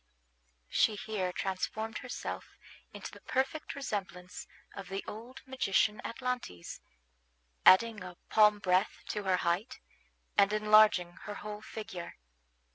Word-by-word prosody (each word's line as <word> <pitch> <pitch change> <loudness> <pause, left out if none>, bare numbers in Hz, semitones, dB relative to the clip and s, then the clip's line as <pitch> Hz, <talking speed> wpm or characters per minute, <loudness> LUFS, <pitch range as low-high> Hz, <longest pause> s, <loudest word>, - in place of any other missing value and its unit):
She 215 - +3
here 205 -3 -2
transformed 205 +4 -3
herself 250 - -6 0.3
into - - -8
the - - -13
perfect 265 +4 -2
resemblance 185 -9 -5 0.3
of 195 -1 -8
the 195 +1 -3
old 235 +5 -8
magician 215 -5 +1
Atlantes, 245 - -4 0.9
adding 215 +2 +7
a 180 -1 -9
palm 210 -1 +5
breadth 185 0 +1
to 210 -2 -3
her 185 -1 +3
height, 180 +9 -1 0.6
and 200 0 +5
enlarging 215 -4 +5
her 205 0 -5
whole 210 0 -7
figure. 215 -5 -7
210 Hz, 120 wpm, -32 LUFS, 185-225 Hz, 0.9 s, adding